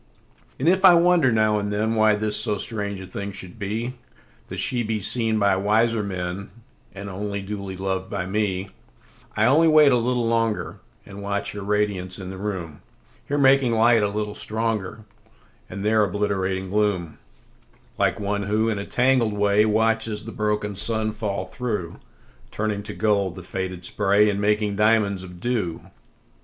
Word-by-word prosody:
And 135 - -2
if 185 +2 +3
I 185 -2 +9
wonder 170 -5 +4
now 110 -1 +2
and 105 0 -3
thenWhy 110 0 +2
this 105 0 +2
so 105 -3 +4
strange 100 -2 -2
a - - -8
thing 100 +2 -6
should 95 0 -8
be—That 115 +5 -7
she 125 -2 +2
be 110 -1 -2
seen 110 +2 +1
by 100 -2 +3
wiser 110 +3 +2
menAnd 95 0 -5 0.6
only 100 +1 -4
duly 100 -1 -6
lov'd 95 0 -3
by 100 -3 -3
me:I 95 - -4
only 150 +7 +5
wait 155 -2 +6
a 125 - +4
little 120 0 0
longer, 115 -1 -1 0.3
And 100 0 -10
watch 100 0 -1
her 105 - -7
radiance 100 -3 -1
in 95 -2 -7
the 95 - -8
room; 95 -7 -5 0.5
Here 145 - -1
making 135 -3 +4
light 115 0 +4
a 105 - +2
little 105 0 -3
stronger, 110 -1 -3 0.7
And 100 +2 -6
there 110 0 +3
obliterating 95 -1 -2
gloom,(Like 90 -11 -3
one 100 0 -2
who, 105 +3 0
in 105 -3 -2
a 100 - -6
tangled 125 -3 +2
way, 105 +1 +3
Watches 110 0 0
the 115 - -7
broken 105 -1 -2
sun 110 +2 0
fall 105 -2 -3
through, 105 -9 -4 0.5
Turning 105 -1 -2
to 100 - -8
gold 100 -4 0
the 95 - -9
faded 95 0 -5
spray, 105 +2 +3
And 100 0 -3
making 105 -1 0
diamonds 105 -3 +2
of 90 -1 -11
dew). 105 -7 -3
105 Hz, 160 wpm, -23 LUFS, 100-110 Hz, 0.7 s, I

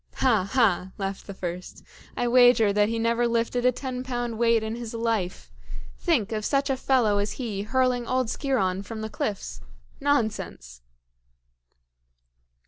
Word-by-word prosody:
"Ha! 215 -7 +2
ha!" 190 -7 +2
laughed 195 -1 -4
the 200 - -6
first; 180 0 -6 0.3
"I 245 - 0
wager 245 -4 +5
that 210 +1 +3
he 230 - -1
never 230 +1 +1
lifted 235 +1 +1
a - - +5
ten 255 0 -5
pound 240 -3 -3
weight 230 -1 +3
in 220 0 -3
his 235 -1 -6
life. 215 - -2 0.5
Think 200 - +1
of 215 -1 -2
such 280 +3 +1
a - - +1
fellow 245 -6 +2
as 205 +1 -1
he 220 -6 -4
hurling 250 +2 0
old 255 0 +1
Sciron 195 -8 0
from 220 +2 -7
the 220 0 -5
cliffs! 205 - -4 0.4
Nonsense!" 215 - -1
230 Hz, 150 wpm, -26 LUFS, 205-250 Hz, 0.5 s, wager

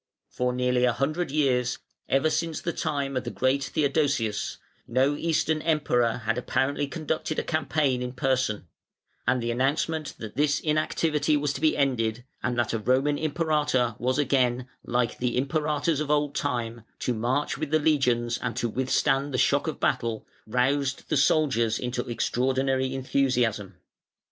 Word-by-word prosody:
For 125 0 0
nearly 125 0 +1
a 125 - +3
hundred 155 +7 -1
years, 130 -4 +1 0.3
ever 145 +4 +3
since 165 -2 -1
the 170 - -3
time 140 -4 -2
of 130 - -1
the 120 - -4
great 130 +3 +1
Theodosius, 140 -6 0 0.3
no 130 +4 +2
Eastern 160 0 0
Emperor 125 -8 +1
apparently 135 +5 0
had 140 - -13
conducted 155 -1 -2
a - - 0
campaign 155 -5 0
in 125 0 -4
person; 125 -6 0 0.6
and 125 -1 +2
the 120 - 0
announcement 145 +5 -1
that 110 -2 -8
this 150 0 +2
inactivity 155 -1 +1
was 145 -1 -1
to 135 - -6
be 155 -1 +3
ended 120 -4 0 0.2
and 125 -1 -1
that 120 -2 0
a 115 - 0
Roman 135 +6 +1
Imperator 150 -7 +1
was 130 +3 0
again, 130 -3 +1 0.2
like 120 0 -1
the 125 -1 0
Imperators 150 +2 0
of 150 - -3
old 145 -1 +1
time, 120 -4 -2 0.2
to 125 - -1
march 125 +6 -1
with 155 -2 -2
the 155 - +3
legions 125 -6 +1
and 120 -2 -3
to 120 -2 0
withstand 135 +3 +1
the 125 - -1
shock - - +2
of - - -3
battle, 115 -2 0 0.2
roused 130 +4 0
the - - +2
soldiers 135 -7 +3
to 125 0 -3
extraordinary 130 +2 0
enthusiasm. 125 -7 0
135 Hz, 160 wpm, -26 LUFS, 125-150 Hz, 0.6 s, a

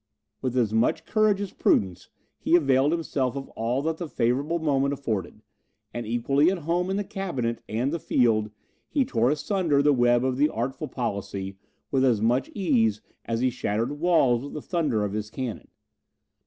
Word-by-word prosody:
With 130 -1 -2
as 110 -4 +1
much 120 +8 +1
courage 215 -2 +2
as 200 - -5
prudence, 95 -3 +1 0.3
he 170 - +3
availed 140 -3 +3
himself 140 -6 -1
of 135 -1 -6
all 120 +5 -2
that 160 0 -1
the 175 - -5
favourable 140 +9 0
moment 140 -3 +1
afforded; 110 -10 -4 0.5
and 120 -2 -5
equally 135 +7 +2
at 190 - 0
home 175 +2 0
in 195 - 0
the 205 - -1
cabinet 135 -13 -3
and 125 +7 -1
the 170 - -1
field, 110 -6 +2 0.4
he 280 -4 +1
tore 120 - +1
asunder 150 -1 +1
the 145 0 +5
web 120 -1 +3
of 130 -1 0
the 150 +2 +3
artful 130 +6 -3
policy, 100 -6 -4 0.4
with 135 -1 +2
as 120 -5 +3
much 120 +4 +1
ease, 115 - +2 0.2
as 115 0 -2
he 130 0 +2
shattered 120 +3 -2
walls 145 -8 +3
with 145 - -8
the 150 - -5
thunder 150 - 0
of 100 - -4
his 105 0 -3
cannon. 125 -2 -5
130 Hz, 180 wpm, -26 LUFS, 115-160 Hz, 0.5 s, the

